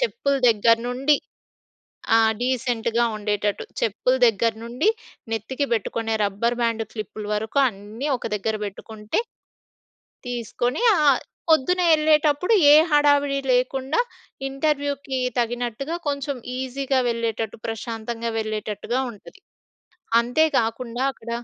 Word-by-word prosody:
చెప్పుల 460 Hz, -, 0 dB
దగ్గర 230 Hz, +1 st, +4 dB
నుండి 270 Hz, +4 st, +2 dB, 1.0 s
ఆ! -, -, +6 dB, 0.2 s
డీసెంట్‌గా 240 Hz, -2 st, 0 dB
ఉండేటట్టు. 210 Hz, -1 st, -1 dB, 0.2 s
చెప్పుల 230 Hz, +4 st, +1 dB
దగ్గర 230 Hz, +1 st, +2 dB
నుండి 240 Hz, -, 0 dB, 0.4 s
నెత్తికి 255 Hz, +6 st, -2 dB
పెట్టుకునే 225 Hz, 0 st, -1 dB
రబ్బర్ 210 Hz, +4 st, 0 dB
బ్యాండు, 230 Hz, -1 st, 0 dB
క్లిప్పులు 215 Hz, -1 st, -6 dB
వరకు 220 Hz, +6 st, -2 dB
అన్నీ 215 Hz, +5 st, -7 dB
ఒక -, -, -14 dB
దగ్గర 215 Hz, +1 st, -1 dB
పెట్టుకుంటే, 210 Hz, -, -4 dB, 1.1 s
తీసుకొని 245 Hz, -, -2 dB
ఆహ్, 290 Hz, -4 st, +4 dB, 0.3 s
పొద్దున్న 355 Hz, +4 st, +3 dB
ఎళ్ళేటప్పుడు 305 Hz, +5 st, +3 dB, 0.2 s
ఏ -, -, +9 dB, 0.2 s
హడావిడి 285 Hz, -1 st, +4 dB
లేకుండా 265 Hz, -, +1 dB, 0.5 s
ఇంటర్వ్యూకి 280 Hz, -1 st, -1 dB, 0.2 s
తగినట్టుగా 240 Hz, +6 st, -2 dB
కొంచెం 280 Hz, 0 st, -2 dB, 0.2 s
ఈజీగా 265 Hz, +1 st, -1 dB
వెళ్ళేటట్టు 225 Hz, -2 st, -3 dB
ప్రశాంతంగా 230 Hz, +1 st, -4 dB
వెళ్ళేటట్టుగా 215 Hz, +2 st, -2 dB
ఉంటది. 225 Hz, -, -15 dB, 0.8 s
అంతేకాకుండా 245 Hz, -2 st, 0 dB
అక్కడ 235 Hz, -3 st, -12 dB
240 Hz, 100 wpm, -23 LUFS, 225-280 Hz, 1.1 s, ఏ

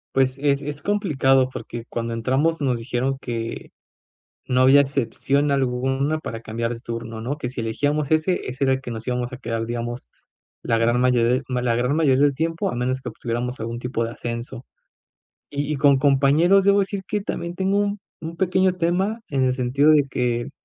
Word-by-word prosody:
Pues, 130 Hz, 0 st, +2 dB
es 140 Hz, -1 st, +1 dB
es 145 Hz, 0 st, -5 dB
complicado, 135 Hz, -10 st, +2 dB
porque 120 Hz, -2 st, -7 dB
cuando 115 Hz, 0 st, -3 dB
entramos 135 Hz, +8 st, +1 dB
nos 130 Hz, -4 st, 0 dB
dijeron 125 Hz, +3 st, -1 dB
que 115 Hz, -2 st, -5 dB, 0.8 s
no 125 Hz, 0 st, +1 dB
había 135 Hz, +2 st, +7 dB
excepción 140 Hz, +1 st, 0 dB
alguna 135 Hz, +3 st, 0 dB
para 115 Hz, -7 st, -6 dB
cambiar 115 Hz, +2 st, -3 dB
de 115 Hz, -, -10 dB
turno, 115 Hz, -1 st, -6 dB
¿no?, 135 Hz, +6 st, -3 dB
que 125 Hz, -, -3 dB
si 125 Hz, 0 st, -5 dB
elegíamos 145 Hz, +6 st, -1 dB
ese, 160 Hz, +3 st, +2 dB
ese 130 Hz, +2 st, -2 dB
era 135 Hz, -, +3 dB
el 130 Hz, -, -4 dB
que 130 Hz, -, -7 dB
nos 115 Hz, 0 st, -6 dB
íbamos 125 Hz, -1 st, -2 dB
a 125 Hz, -, -7 dB
quedar, 115 Hz, -2 st, -3 dB
digamos, 120 Hz, +1 st, -4 dB, 0.6 s
la 115 Hz, -, +1 dB
gran 120 Hz, +2 st, +2 dB
mayoría 125 Hz, -1 st, +3 dB
de 130 Hz, -, +1 dB
la 125 Hz, -2 st, 0 dB
gran 125 Hz, +4 st, +1 dB
mayoría 140 Hz, -4 st, +3 dB
del 145 Hz, -1 st, +4 dB
tiempo, 165 Hz, +3 st, -1 dB
a -, -, -4 dB
menos 125 Hz, +2 st, -1 dB
que -, -, -5 dB
obtuviéramos 120 Hz, +2 st, -4 dB
algún 115 Hz, +1 st, -4 dB
tipo 125 Hz, -1 st, -2 dB
de 115 Hz, -, -3 dB
ascenso. 120 Hz, +1 st, -6 dB, 0.8 s
Y 145 Hz, +1 st, -3 dB
y -, -, -1 dB
con 140 Hz, 0 st, +4 dB
compañeros, 145 Hz, +8 st, +4 dB
debo 200 Hz, 0 st, +5 dB
decir 195 Hz, 0 st, -2 dB
que 210 Hz, -, -1 dB
también 170 Hz, -3 st, -4 dB
tengo 190 Hz, +2 st, +1 dB
un 205 Hz, 0 st, 0 dB, 0.2 s
un 165 Hz, +1 st, -6 dB
pequeño 185 Hz, 0 st, +2 dB
tema 185 Hz, +6 st, 0 dB
en 135 Hz, -2 st, +1 dB
el 130 Hz, 0 st, +2 dB
sentido 130 Hz, +4 st, +3 dB
de 150 Hz, -2 st, +5 dB
que 120 Hz, -2 st, -1 dB
130 Hz, 195 wpm, -23 LUFS, 120-150 Hz, 0.8 s, había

